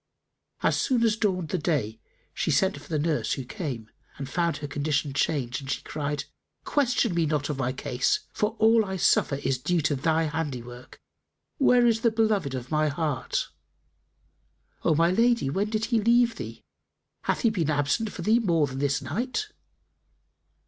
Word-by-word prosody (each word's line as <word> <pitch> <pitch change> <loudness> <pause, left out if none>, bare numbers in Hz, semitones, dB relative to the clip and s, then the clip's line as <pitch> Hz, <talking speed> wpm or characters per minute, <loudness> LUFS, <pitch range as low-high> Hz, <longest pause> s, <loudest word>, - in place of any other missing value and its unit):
As - - +2
soon 250 -4 +1
as 220 -2 +3
dawned 185 -7 -1
the 185 - -1
day, 140 - -1 0.3
she - - -2
sent 190 0 +2
for - - -16
the 160 - 0
nurse, 155 0 0
who 135 - -4
came 130 - -5 0.3
and 135 - -5
found 170 +3 0
her 145 - -5
condition 145 0 -1
changed 135 -2 -1
and 135 - -9
she - - -2
cried, 145 -1 -3 0.4
"Question 250 -7 +1
me 170 -2 +1
not 150 -1 -1
of 140 - -5
my 130 -1 0
case; 130 -1 0
for 210 +2 -1
all 225 +1 +5
I 190 -2 -4
suffer 150 - +3
is 135 -2 -1
due 175 +7 +1
to 145 0 +1
thy 160 +4 +1
handiwork. 130 -6 -5 0.6
Where 250 -3 +5
is 225 -1 +3
the 230 - +4
beloved 215 -11 +1
of 125 +2 -6
my 155 0 +2
heart?" 150 -2 -2 1.3
"O 155 - +3
my 165 +3 +3
lady, 230 - +2
when 200 +7 0
did 220 0 -1
he 225 - +4
leave 235 +1 +4
thee? - - -8 0.6
Hath - - 0
he 230 - +3
been 170 -8 -1
absent 150 +9 0
from - - -7
thee 220 +3 +4
more 170 -9 +2
than 130 -1 -6
this 140 0 0
night?" 250 - -2
160 Hz, 175 wpm, -26 LUFS, 140-215 Hz, 1.3 s, all